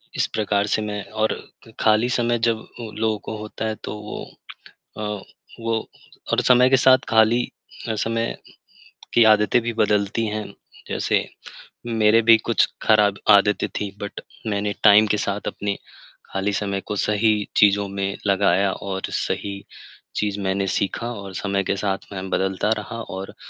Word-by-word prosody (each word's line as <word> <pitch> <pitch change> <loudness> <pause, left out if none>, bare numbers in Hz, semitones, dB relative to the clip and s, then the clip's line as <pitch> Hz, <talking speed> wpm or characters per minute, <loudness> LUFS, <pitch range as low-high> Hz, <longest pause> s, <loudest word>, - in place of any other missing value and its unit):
इस - - +1
प्रकार 105 -1 0
से 110 - -1
मैं 105 -2 -4
और 110 0 0 0.5
खाली 110 +2 +3
समय 120 -1 +1
जब 115 -1 +1 0.2
ओ, 110 - -7
लोगों 110 0 -1
को 110 - -6
होता 105 +1 -6
है 110 0 -2
तो - - -5
वो, 105 - -7 0.8
अ, 105 -2 -4 0.4
वो 115 -1 -2 0.4
और - - +3
समय 125 0 +5
के 135 - +6
साथ 130 0 +6
खाली 110 +2 +4 0.5
हर 110 - -1
समय 115 +2 -1 0.8
की 120 - +6
आदतें 105 +2 +4
भी 120 +1 -2
बदलती 105 0 +1
हैं। 110 0 -3 0.4
जैसे, - - +1 0.7
मेरे 110 -1 +4
भी 115 0 +7
कुछ 115 +1 +2 0.2
खराब 105 -2 +4
आदतें 100 -1 +4
थी 105 - -3
बट 100 - -6 0.3
मैंने 105 -1 -1
टाइम 105 0 +8
के 105 0 +1
साथ 100 0 -3
अपने 100 0 -3 0.6
खाली 95 +1 -1
समय 100 -1 -2
को 105 - -3
सही 105 +2 +2 0.2
चीज़ों 100 0 +4
में 100 0 -3
लगाया 95 -1 +3
और 95 -1 -5
सही 100 -1 -2 0.6
चीज़ 105 -1 -1
मैंने 95 0 0
सीखा 115 +5 -2
और 100 -3 -8
समय 100 0 -1
के 100 - -1
साथ 95 -1 -1
मैं 95 -1 -5
बदलता 95 +2 0
रहा 115 +2 -6
और 95 -1 -7
105 Hz, 160 wpm, -22 LUFS, 100-110 Hz, 0.8 s, टाइम